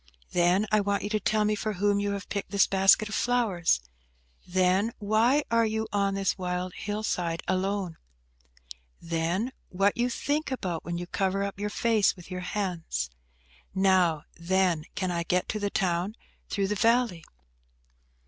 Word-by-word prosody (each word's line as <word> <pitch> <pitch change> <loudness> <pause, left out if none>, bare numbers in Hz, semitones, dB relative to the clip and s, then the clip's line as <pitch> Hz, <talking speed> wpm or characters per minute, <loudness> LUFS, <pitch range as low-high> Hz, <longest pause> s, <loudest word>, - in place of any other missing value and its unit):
Then, 180 +4 +3
I 215 -1 +4
want 200 0 0
you 205 - -2
to 215 0 0
tell 215 +1 +1
me 210 - +2
for 215 +1 -2
whom 205 +1 +1
you 205 0 -1
have 200 -1 -5
picked 200 -1 -4
this 200 0 +4
basket 195 +2 +4
of 215 - -7
flowers? 215 - +2 0.7
Then, 185 +4 +2
why 225 +7 +3
you 220 -1 +1
are 200 -1 +2
on 195 - -2
this 195 0 0
wild 180 0 -2
hill 210 +1 -4
side 170 -5 -1
alone? 185 -2 -1 1.0
Then, 170 +8 -1 0.2
what 195 +2 +2
you 240 +1 +1
think 290 +5 -1
about 185 -11 -3
when 170 0 -3
you 175 - -4
cover 195 +2 0
up 200 -1 -4
your 210 0 -1
face 220 -2 +2
with 180 +1 -14
your 180 0 -4
hands? 180 - -3 0.6
Now, 185 -5 +3
then, 175 -2 +1
can 185 -1 -1
I 170 -1 -1
get 180 +2 0
to 215 - -2
the 205 0 -1
town 185 +2 0 0.3
through 195 -1 0
the - - +1
valley?" 230 -5 +2
195 Hz, 165 wpm, -28 LUFS, 180-215 Hz, 1.0 s, I